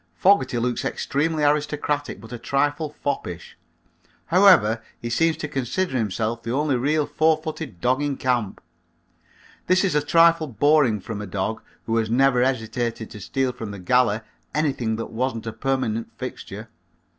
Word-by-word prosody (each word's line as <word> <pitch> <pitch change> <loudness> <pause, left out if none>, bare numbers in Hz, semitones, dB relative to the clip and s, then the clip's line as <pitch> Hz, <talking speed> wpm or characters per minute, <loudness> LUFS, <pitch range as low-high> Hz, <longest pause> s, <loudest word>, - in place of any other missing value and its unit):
Fogerty 155 - +3
looks 120 +1 -1
extremely 155 +2 -1
aristocratic 145 -2 0
but 110 +2 -13
a 120 - -6
trifle 145 +4 0
foppish. 90 - -4 0.7
However, 165 - +5 0.2
he 120 - -5
seems 165 +6 +2
to 150 - -4
consider 135 +5 -2
himself 110 0 -1
the 115 - -4
only 145 +1 +1
real 145 +5 +1
four 155 +2 +2
footed 155 - -7
dog 130 +7 +1
in 145 -2 -1
camp. 120 -6 -1 1.1
This 185 +1 +4
is 190 -5 +1
a 150 - +3
trifle 165 +1 +4
boring 130 -3 +3
from 105 +1 -6
a 105 - -6
dog 100 +4 -3 0.2
who 115 0 0
has 110 -1 0
never 125 +1 +3
hesitated 115 -2 -2
to 105 - -9
steal 130 +6 -1
from 115 -3 -7
the 100 - -7
galley 110 +3 +2 0.3
anything 135 -7 0
that 115 - -5
wasn't 115 -1 -2
a 115 - -4
permanent 130 -5 -2
fixture. - - -7
130 Hz, 155 wpm, -23 LUFS, 115-150 Hz, 1.1 s, However